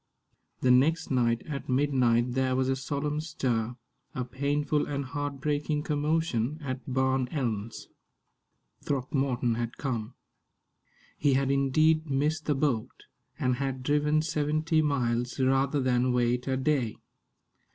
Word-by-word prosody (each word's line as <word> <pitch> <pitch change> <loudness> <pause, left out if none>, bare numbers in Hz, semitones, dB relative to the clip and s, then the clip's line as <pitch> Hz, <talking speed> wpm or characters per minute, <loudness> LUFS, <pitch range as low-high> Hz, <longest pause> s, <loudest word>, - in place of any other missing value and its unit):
The 125 - +4
next 155 +6 +3
night 120 -3 +2
at 140 -3 -6
midnight 125 -3 +2
there 130 0 +1
was 130 0 +1
a 135 - +2
solemn 145 +3 -2
stir, 125 -7 -2 0.4
a 125 - -2
painful 145 +3 0
and 140 -1 -3
heart 145 +1 -4
breaking 150 +1 -1
commotion, 150 -3 0
at 130 -3 -5
Barn 130 0 +1
Elms. 115 -6 -3 1.0
Throckmorton 130 -3 0
had 120 -1 -3
come. 120 -3 -3 1.0
He 145 -2 +3
had 135 0 +1
indeed 155 +3 +2
missed 150 +3 0
the 150 - +2
boat, 135 -6 -1 0.3
and 125 -1 0
had 135 -1 -3
driven 150 +2 +2
seventy 155 +1 +1
miles 125 -4 0
rather 135 +2 +2
than 125 -1 +2
wait 125 +1 +1
a 130 -1 +1
day. 130 -5 0
135 Hz, 130 wpm, -28 LUFS, 125-150 Hz, 1.0 s, The